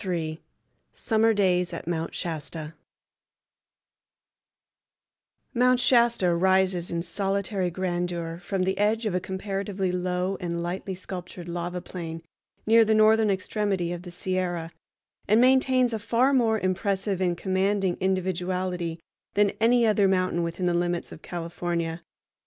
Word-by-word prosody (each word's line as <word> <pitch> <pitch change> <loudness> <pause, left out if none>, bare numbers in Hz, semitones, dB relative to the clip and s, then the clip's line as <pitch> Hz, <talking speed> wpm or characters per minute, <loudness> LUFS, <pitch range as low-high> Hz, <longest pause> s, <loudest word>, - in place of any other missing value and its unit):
III. 165 -4 -3 0.5
Summer 225 0 +2
Days 180 -4 +2
at - - -6
Mount 165 -1 -2
Shasta 160 -1 -5 2.8
Mount 250 0 +4
Shasta 235 -8 +3
rises 185 0 +2
in 170 0 -2
solitary 195 0 -1
grandeur 175 -2 -3
from 185 +1 -2
the 190 +1 -1
edge 220 +2 +1
of 210 - 0
a 180 - +1
comparatively 195 0 -3
low 180 +1 -1
and 170 -2 -3
lightly 185 +2 -4
sculptured 180 -1 -8
lava 175 +1 -4
plain 165 -2 -7 0.4
near 225 +1 +6
the 220 0 +2
northern 215 0 +5
extremity 190 -2 -1
of 175 - -6
the 180 - -9
Sierra, 175 -2 -2 0.6
and 215 +3 +5
maintains 255 -1 +4
a 220 - -1
far 240 +6 +2
more 225 -4 +3
impressive 190 0 -1
and 175 -2 +1
commanding 190 0 0
individuality 185 -2 -1 0.4
than 205 -1 +4
any 235 +1 +4
other 210 -2 +4
mountain 185 -2 +1
within 170 +2 -2
the 175 - +2
limits 175 0 -1
of 160 - -10
California. 170 -1 -3
185 Hz, 130 wpm, -26 LUFS, 175-205 Hz, 2.8 s, near